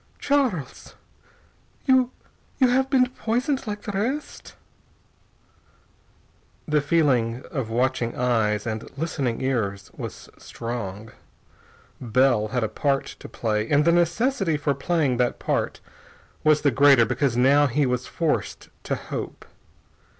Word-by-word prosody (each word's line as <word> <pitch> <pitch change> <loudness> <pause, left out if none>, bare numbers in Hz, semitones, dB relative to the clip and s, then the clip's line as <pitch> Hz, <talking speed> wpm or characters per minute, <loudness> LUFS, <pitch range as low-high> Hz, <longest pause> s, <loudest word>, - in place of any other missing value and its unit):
"Charles 250 - -1 0.9
you 260 -2 +4 0.5
you 260 -2 +4
have 265 +2 +2
been 260 -2 +4
poisoned 255 +2 -2
like 210 0 -5
the 210 - -4
rest?" 240 +10 -4 2.1
The 150 -1 +2
feeling 130 -6 +1
of 130 -7 -3
watching 120 0 0
eyes 110 -4 +1
and 110 -1 -4
listening 140 -6 -2
ears 105 -7 -2
was - - -8
strong. 110 -2 -6 0.9
Bell 120 -2 +2
had 125 +2 -1
a - - +1
part 140 +4 -1
to - - -10
play, 110 -1 -2
and 145 +1 +3
the 170 - +5
necessity 175 - +1
for 145 -1 0
playing 140 -2 0
that 125 0 0
part - - -2 0.6
was 155 -1 +4
the 145 - +3
greater 135 -1 +6
because 125 +1 0
now 140 +3 +5
he 140 +3 +1
was 125 0 -1
forced 165 -3 -2 0.2
to - - -1
hope. - - -7
140 Hz, 125 wpm, -24 LUFS, 120-175 Hz, 2.1 s, greater